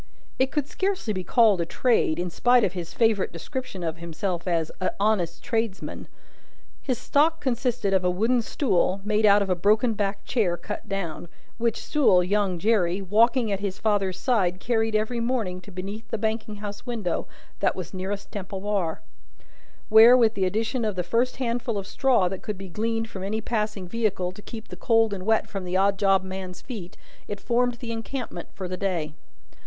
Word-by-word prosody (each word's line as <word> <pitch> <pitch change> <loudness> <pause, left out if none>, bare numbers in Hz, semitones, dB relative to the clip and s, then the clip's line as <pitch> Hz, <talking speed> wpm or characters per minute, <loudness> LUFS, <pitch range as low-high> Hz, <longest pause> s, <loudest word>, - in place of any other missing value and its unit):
It 260 0 +3
could 290 -1 -1
scarcely 380 - -1
be 185 -2 -3
called 210 -1 +4
a - - 0
trade, 225 -8 +2
in 175 0 -2
spite 245 +6 +4
of 185 - +1
his 175 -2 -5
favourite 225 -2 +2
description 195 - -6
of 165 -1 -2
himself 170 +2 -4
as 165 -3 0
"a 185 - +1
honest 200 -5 +1
tradesman." 225 -6 -3 0.7
His 255 -3 -1
stock 315 +6 +2
consisted 240 -5 0
of 190 -1 +3
a 180 - +3
wooden 225 +7 +2
stool, 195 - +1
made 215 0 +3
out 205 0 +6
of 195 - -5
a - - +3
broken 215 +6 +3
backed 200 -1 -2
chair 195 -9 +1
cut 210 +2 -7
down, 175 -4 -4 0.3
which 230 -1 0
stool, 225 -12 +4
young 195 -1 +1
Jerry, 190 -2 +2
walking 225 +4 +3
at 195 - 0
his 200 -2 -3
father's 195 -4 0
side, 185 -6 +1
carried 225 -1 0
every 220 +3 0
morning 230 -7 -1
to 195 - -13
beneath 195 +4 -6
the - - -2
banking 220 0 -2
house 205 -1 -7
window 225 -8 -2 0.3
that - - +1
was 180 -1 -6
nearest 195 +2 -4
Temple 195 -1 -5
Bar: 195 -6 -1 0.9
where, 225 +3 +9
with 225 -3 +4
the 190 -3 0
addition 225 +6 -1
of 210 -3 -1
the 180 - -1
first 235 +8 +1
handful 240 -2 -1
of 195 - -3
straw 240 -3 +2
that 185 +1 -4
could 210 -2 -4
be 195 0 -8
gleaned 225 +4 -1
from 195 -4 -8
any 210 +3 -1
passing 210 -4 -2
vehicle 195 -3 -1
to 190 - -13
keep 220 +1 -9
the - - -7
cold 225 -3 +2
and 190 0 -6
wet 220 0 +3
from 195 -2 -5
the 180 +1 -1
odd 195 0 +2
job 195 -2 +4
man's 190 -1 -6
feet, 200 -8 -8 0.3
it 205 - -5
formed 245 +1 +1
the 235 -1 -6
encampment 230 -4 -5
for 190 -2 -4
the 185 - -4
day. 175 -6 -2
205 Hz, 190 wpm, -25 LUFS, 185-230 Hz, 0.9 s, where